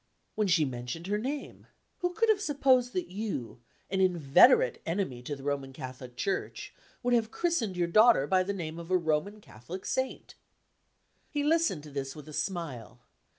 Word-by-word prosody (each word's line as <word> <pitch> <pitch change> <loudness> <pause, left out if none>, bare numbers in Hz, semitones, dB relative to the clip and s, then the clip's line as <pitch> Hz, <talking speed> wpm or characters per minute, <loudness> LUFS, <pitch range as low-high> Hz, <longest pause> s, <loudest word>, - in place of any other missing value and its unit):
"When 215 -1 0
she 165 -4 +4
mentioned 125 +5 -5
her 205 +2 -1
name. 275 +5 -5 0.3
Who 355 0 -1
could 455 +1 +2
have 420 -2 +3
supposed 265 -7 +2
that 365 -2 -2
you 185 - -5 0.3
an 190 -1 +1
inveterate 185 - +5
enemy 165 -8 -2
to 145 +4 -5
the 135 - -12
Roman 140 -1 -2
Catholic 130 -1 -9
Church 195 - -3 0.3
would 245 0 +2
have 225 -2 +2
christened 235 - -1
your 175 -1 +1
daughter 215 - +5
by 185 +4 +3
the 190 +2 -1
name 170 -4 -5
of 170 0 -9
a 185 - +4
Roman 170 +5 -1
Catholic 180 - -10
Saint?" 260 0 -3 1.0
He 290 -1 -1
listened 310 - +2
to 150 - -11
this 135 -1 -4
with 150 0 -11
a 155 - -10
smile. 130 - -4
185 Hz, 175 wpm, -29 LUFS, -, 1.0 s, inveterate